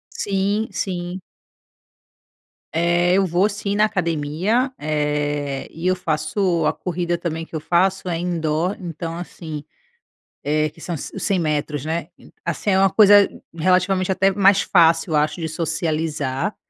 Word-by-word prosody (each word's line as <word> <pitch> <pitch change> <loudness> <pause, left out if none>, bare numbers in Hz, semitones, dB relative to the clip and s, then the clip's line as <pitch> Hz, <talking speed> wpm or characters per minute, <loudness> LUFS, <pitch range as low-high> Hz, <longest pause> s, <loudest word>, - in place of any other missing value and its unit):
Sim, 200 +2 0
sim. 180 -1 -3 1.5
Eh, 175 +2 +2
eu 195 0 +3
vou 185 +4 +2
sim 200 -1 -3
na 210 +1 +4
academia, 180 - 0
eh, 150 -2 -2
e 165 +3 -4
eu 185 - +3
faço 170 +1 0
a - - +2
corrida 175 -1 -2
também 165 -1 -3
que 165 - -10
eu - - -1
faço 185 +4 +1
é 170 -2 -1
indoor, 170 +1 -1
então 165 -1 -5
assim 160 -3 -7 0.8
eh, 155 +1 +1
que 160 - -20
são 170 +1 -4
os 150 - -7
100 195 - +1
metros, 150 -3 -1
né? 160 0 -2
E - - -18
assim, 170 +4 -2
é 190 - +3
uma 195 0 +5
coisa 205 0 +7 0.3
relativamente 185 +3 +2
até 190 +1 +3
mais 195 0 +4
fácil, 165 -2 +3
acho, 150 +3 +1
de 160 - -2
socializar, 160 0 -2
170 Hz, 145 wpm, -21 LUFS, 155-190 Hz, 1.5 s, coisa